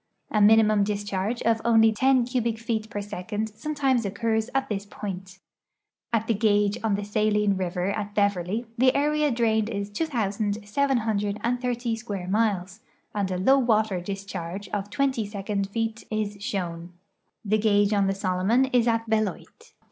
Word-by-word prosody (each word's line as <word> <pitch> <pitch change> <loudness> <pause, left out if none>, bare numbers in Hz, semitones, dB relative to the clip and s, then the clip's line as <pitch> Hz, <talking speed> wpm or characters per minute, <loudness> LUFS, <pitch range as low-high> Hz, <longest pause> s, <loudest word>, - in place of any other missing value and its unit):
A 210 - +2
minimum 215 0 +5
discharge 205 +2 -2
of 225 0 +2
only 225 -1 +5
10 260 +2 +3
cubic 235 -2 -1
feet 220 -1 -3
per 205 -2 -4
second 205 +2 -4
sometimes 265 +2 0
occurs 220 +3 -1
at 270 - +1
this 200 -2 -3
i)oint. 190 -3 -7 0.7
At 225 -2 +1
the 230 - +1
gauge 205 -1 +2
on 215 -3 +2
the 205 - -3
Saline 210 -1 +1
river 180 0 -1
at 205 0 -4
Beverly 200 +2 0
the 255 0 +4
area 300 +1 +2
drained 225 -3 +1
is 200 -2 -4
2,730 225 0 -1
square 205 -5 -5
miles, 200 -2 0 0.3
and 200 -2 -1
a 185 - -2
low 265 +9 +4
water 220 -6 +1
discharge 195 0 -6
of 205 0 -3
20 265 -1 0
second 200 -1 -3
feet 225 +1 -3
is 215 -1 -2
shown. 175 -4 -4 0.5
The 215 +2 +2
gauge 205 -1 +3
on 200 -1 +2
the 195 - 0
Solomon 195 +6 +2
is 245 -1 +4
at 230 -1 +1
Beloit. 215 -4 -3
215 Hz, 150 wpm, -26 LUFS, 200-230 Hz, 0.7 s, minimum